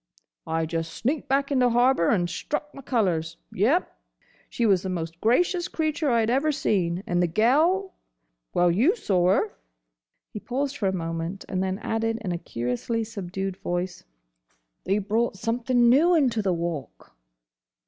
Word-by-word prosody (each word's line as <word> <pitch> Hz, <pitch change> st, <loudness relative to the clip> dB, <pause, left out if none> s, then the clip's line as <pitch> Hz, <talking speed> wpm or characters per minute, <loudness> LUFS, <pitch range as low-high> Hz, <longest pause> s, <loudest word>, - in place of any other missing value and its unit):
I 160 Hz, 0 st, 0 dB
just 165 Hz, 0 st, -3 dB
sneaked 280 Hz, +5 st, -1 dB
back 275 Hz, +1 st, +1 dB
into 255 Hz, -3 st, +3 dB
harbour, 240 Hz, -7 st, +3 dB
and 175 Hz, -5 st, +2 dB
struck 295 Hz, +10 st, -4 dB
my 275 Hz, -, -10 dB
colours. 175 Hz, -10 st, 0 dB
Yes!— 260 Hz, -, +2 dB, 0.7 s
She 235 Hz, -, -1 dB
was 195 Hz, -5 st, +4 dB
the 190 Hz, -, -4 dB
most 165 Hz, -2 st, -5 dB
gracious 350 Hz, -, +2 dB
creature 310 Hz, -3 st, -1 dB
I 230 Hz, -2 st, +3 dB
'd 225 Hz, -, 0 dB
ever 280 Hz, +5 st, +2 dB
seen. 185 Hz, -, 0 dB
And 175 Hz, -1 st, 0 dB
the 175 Hz, -, +3 dB
gel—! 310 Hz, -, +2 dB, 0.6 s
Well, 175 Hz, 0 st, +3 dB
you 255 Hz, -, +3 dB
saw 185 Hz, -, +1 dB
her." 215 Hz, -, -1 dB, 0.8 s
He 210 Hz, -, -5 dB
paused 275 Hz, +5 st, -3 dB
for 200 Hz, -, 0 dB
a -, -, +2 dB
moment, 165 Hz, +1 st, -4 dB
and 185 Hz, -1 st, -2 dB
then 190 Hz, 0 st, -1 dB
added 225 Hz, 0 st, -1 dB
in 190 Hz, -4 st, -3 dB
a 170 Hz, -, -2 dB
curiously 125 Hz, -, -2 dB
subdued 195 Hz, -3 st, -5 dB
voice: 175 Hz, +1 st, -3 dB, 0.8 s
"They 195 Hz, +3 st, +2 dB
brought 210 Hz, +1 st, 0 dB
something 240 Hz, +3 st, +1 dB
new 315 Hz, +9 st, +5 dB
into 250 Hz, -8 st, +2 dB
the 195 Hz, -2 st, 0 dB
Walk." 165 Hz, -, -5 dB
215 Hz, 160 wpm, -25 LUFS, 175-260 Hz, 0.8 s, new